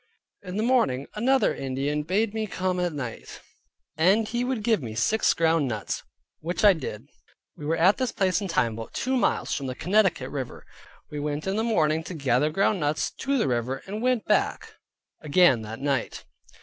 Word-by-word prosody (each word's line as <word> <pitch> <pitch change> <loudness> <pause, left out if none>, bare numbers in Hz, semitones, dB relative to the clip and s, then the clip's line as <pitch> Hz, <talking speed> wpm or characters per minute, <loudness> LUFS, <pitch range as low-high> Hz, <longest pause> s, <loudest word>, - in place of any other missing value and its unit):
In 185 0 -6
the 215 - 0
morning, 140 - +2
another 260 +5 +2
Indian 135 +3 -2
bade 200 +7 0
me 220 -1 -2
come 185 -1 -2
at 175 -1 0
night, 130 -7 -7 0.6
and 195 +8 +3
he 240 +2 -1
would 250 -4 -2
give 220 -6 +2
me 110 -4 -6
six 220 - +2
ground 165 -3 +2
nuts, 110 -4 -3 0.4
which 175 +6 -1
I 205 - +8
did. 130 - -7 0.5
We 150 - -7
were 165 - +1
at 185 +5 +4
this 255 -3 -1
place 190 0 +1
and 195 - -4
time 120 -9 +1
about 115 +1 -8
two 260 +1 0
miles 250 - +1
from 135 - -3
[the] 130 - -4
Connecticut 180 -6 +1
river. 135 -4 -6 0.5
We 150 - -4
went 145 +1 -3
in 190 +1 -1
the 220 - 0
morning 160 -9 +1
to 180 - -6
gather 140 0 +1
ground 195 +4 +1
nuts, 150 0 0
to 275 +1 -1
the 230 - +1
river, 125 +2 -2
and 210 +3 -5
went 250 -2 +1
back - - 0 0.5
again 150 -5 +4
that 110 +1 -7
night. 140 -1 -2
165 Hz, 190 wpm, -26 LUFS, 140-215 Hz, 0.6 s, I